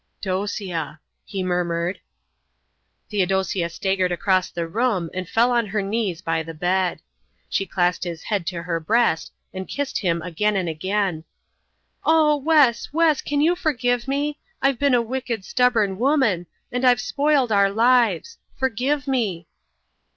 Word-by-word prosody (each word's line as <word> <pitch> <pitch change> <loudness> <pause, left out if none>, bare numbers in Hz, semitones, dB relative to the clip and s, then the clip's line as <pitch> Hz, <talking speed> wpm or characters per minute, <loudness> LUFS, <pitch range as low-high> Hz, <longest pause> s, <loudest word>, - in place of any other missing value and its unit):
"Dosia," 185 -5 -3 0.3
he 195 -2 -4
murmured. 175 0 -1 1.1
Theodosia 190 -3 0
staggered 190 +1 0
across 185 +1 +1
the 170 -1 -4
room 200 -4 0
and 185 -2 -5
fell 235 +2 +3
on 235 -2 +1
her 210 +1 -1
knees 195 -4 -2
by 165 -1 0
the 165 0 -8
bed. 180 +2 0 0.5
She 195 - -1
clasped 175 -1 0
his 170 -2 -5
head 200 -6 -2
to 170 -3 -3
her 170 -1 -2
breast 215 -1 +1 0.2
and 190 0 -6
kissed 285 -1 -3
him 170 -4 0
again 200 +5 0
and 185 -3 0
again. 185 +1 -1 0.8
"Oh, 315 -2 +4
Wes, 285 -5 +3
Wes, 315 -1 +3
can 290 0 -1
you 335 +4 +3
forgive 245 -7 0
me? 290 +2 -1 0.2
I've 270 -2 +1
been 280 -3 +3
a 240 - +2
wicked, 235 -4 -4
stubborn 225 -6 +2
woman 245 - +2 0.2
and 250 +1 -2
I've 250 -2 +5
spoiled 280 0 +1
our 200 -1 +4
lives. 245 - +2 0.2
Forgive 265 +3 -1
me." 210 -11 -1
205 Hz, 145 wpm, -23 LUFS, 180-255 Hz, 1.1 s, I've